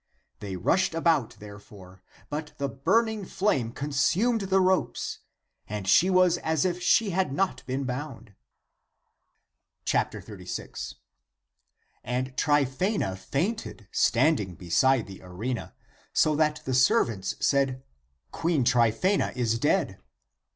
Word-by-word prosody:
They 100 -2 -5
rushed 165 - +1
about, 165 -7 +1
therefore; 100 -3 -13 0.3
but 150 +1 -4
the 140 - -1
burn 180 - +2
ing 220 -2 -4
flame 175 - 0
consumed 155 - +1
the 190 0 +4
ropes, 185 0 0 0.5
and 105 -2 -5
she 165 - +5
was 185 -2 +4
as 160 -1 0
if 180 -1 -1
she 200 +3 +3
had 185 -3 0
not 140 -4 -1
been 130 +2 -2
bound. 125 -4 -6 1.5
36. - - -4 1.1
And 125 +2 -3
Tryphsena 145 - +1
fainted 140 - -3
standing 115 - +2
beside 110 - +2
the 95 -1 -11
arena, 110 +7 -5 0.4
so 155 -1 +3
that 150 0 +1
the 130 - -2
servants 125 - +2
said, 135 -2 +1 0.2
" 65 0 -46
Queen 165 -5 0
Tryphaena 120 - +2
is 115 -2 0
dead." - - +1
135 Hz, 115 wpm, -27 LUFS, 115-175 Hz, 1.5 s, she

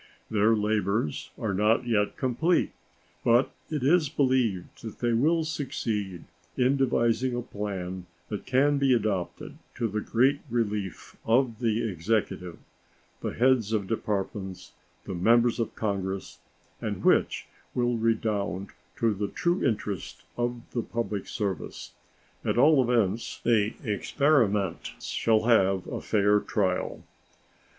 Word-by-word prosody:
Their 110 +1 +4
labors 105 -5 0
are 105 -3 -2
not 110 +5 +2
yet 105 -4 +1
complete, 150 +7 +1 0.5
but 120 +3 +4 0.2
it 150 -5 -2
is 155 +1 +4
believed 130 - 0
that 110 -2 -8
they 120 -1 0
will 160 +8 +3
succeed 110 - -3 0.3
in 130 +2 +3
devising 125 -1 +1
a 120 - -2
plan 95 -4 -5 0.2
that 105 - -5
can 140 +2 +3
be 135 -2 +4
adopted 100 -6 -3 0.2
to 120 -2 0
the 105 0 -2
great 130 +7 +2
relief 105 -5 -2
of 115 -1 +2
the 115 -1 +1
Executive, 90 -2 -2 0.6
the - - -3
heads 120 -3 +3
of 105 -3 0
Departments, 95 -3 -3 0.3
and 90 -1 -4
members 120 +2 +4
of 115 - -2
Congress, 100 -2 -3 0.4
and - - -3
which - - +3 0.3
will 120 -1 +1
redound 110 -4 -1 0.2
to 115 -2 +1
the 100 +1 -2
true 175 - 0
interest 105 -6 -2
of 120 0 -2
the 120 - -1
public 115 -4 -3
service. 100 -5 -4 0.5
At - - 0
all 145 +2 +6
events, 115 -3 0
the 110 -2 +2
experiment 105 - +1
shall 110 -1 +1
have 95 -5 +3
a - - -5
fair 105 -1 +3
trial. 95 -3 -1
110 Hz, 125 wpm, -27 LUFS, 100-125 Hz, 0.6 s, all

